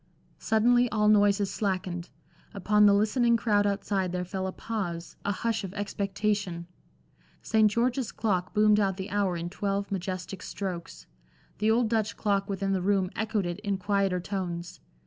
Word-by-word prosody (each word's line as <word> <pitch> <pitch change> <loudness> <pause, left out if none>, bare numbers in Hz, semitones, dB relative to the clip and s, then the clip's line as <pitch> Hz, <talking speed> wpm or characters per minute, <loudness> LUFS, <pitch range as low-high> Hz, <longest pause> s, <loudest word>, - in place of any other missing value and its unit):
Suddenly 240 +3 +3
all 210 -1 +1
noises 205 -1 +4
slackened; 185 -4 -2 0.5
upon 210 +2 +4
the 200 - +6
listening 230 +3 +3
crowd 205 -3 +2
outside 195 -2 -1
there 180 0 -2
fell 190 +1 -3
a - - -3
pause, 180 -6 -5
a 205 - 0
hush 225 +1 -1
of 195 0 -7
expectation. 200 -3 -2 0.8
St. 220 -1 +4
George's 240 +3 0
clock 185 -5 -1
boomed 210 -1 +4
out 195 -2 +1
the 190 +1 -6
hour 195 -3 0
in 170 +1 -4
twelve 200 +2 -2
majestic 185 0 -4
strokes. 180 -4 -6 0.5
The 215 +1 +2
old 230 +1 +3
Dutch 220 -1 -1
clock 200 -2 0
within 195 0 -1
the 190 - 0
room 190 -1 +1
echoed 215 -2 -1
it 175 +2 -4
in 200 -2 -2
quieter 195 -1 0
tones. 175 -2 -5
200 Hz, 160 wpm, -28 LUFS, 185-215 Hz, 0.8 s, the